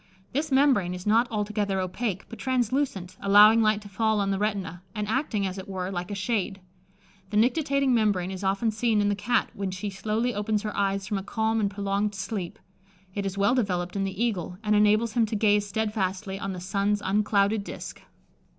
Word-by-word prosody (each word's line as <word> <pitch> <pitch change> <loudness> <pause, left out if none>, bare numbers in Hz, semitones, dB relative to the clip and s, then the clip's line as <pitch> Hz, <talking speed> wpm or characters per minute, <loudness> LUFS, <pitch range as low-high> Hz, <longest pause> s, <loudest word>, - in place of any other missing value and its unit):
This 295 +3 -1
membrane 265 -10 +3
is 180 - -8
not 225 +3 +4
altogether 210 -3 -1
opaque, 190 +1 -3
but 230 - -10
translucent, 245 -7 -1
allowing 210 +3 +7
light 215 -1 +2
to - - -10
fall 220 +2 +1
on 195 -1 0
the 195 - -1
retina, 200 -4 -2
and 210 -1 -2
acting, 220 -4 0
as 190 0 -4
it 190 - -8
were, 185 -1 -3
like 175 0 -4
a 205 - -3
shade. 195 -1 -1 0.7
The 210 - -1
nictitating 275 +2 +2
membrane 205 -5 +1
is 190 +1 -6
often 195 +4 +1
seen 220 0 +1
in 205 0 +2
the 205 - +1
Cat 215 +4 0
when 195 -1 -3
she 185 +2 -4
slowly 215 +5 -1
opens 210 0 -1
her 210 - -4
eyes 195 -1 0
from 205 -1 -2
a - - -7
calm 220 +2 0
and 205 -2 +1
prolonged 200 +1 -1
sleep: 195 -2 -4 0.6
it 200 -1 -2
is 195 0 -5
well 200 +4 +3
developed 180 -7 -1
in 195 - 0
the 195 +3 -2
eagle, 180 -5 -3
and 210 0 +2
enables 210 +2 +3
him 230 -1 +2
to 215 - -3
gaze 205 -1 +3
steadfastly 195 -2 -2
on 195 -1 -3
the 180 - -6
sun's 200 +3 0
unclouded 205 +1 +2
disk. - - -8
205 Hz, 200 wpm, -26 LUFS, 195-220 Hz, 0.7 s, allowing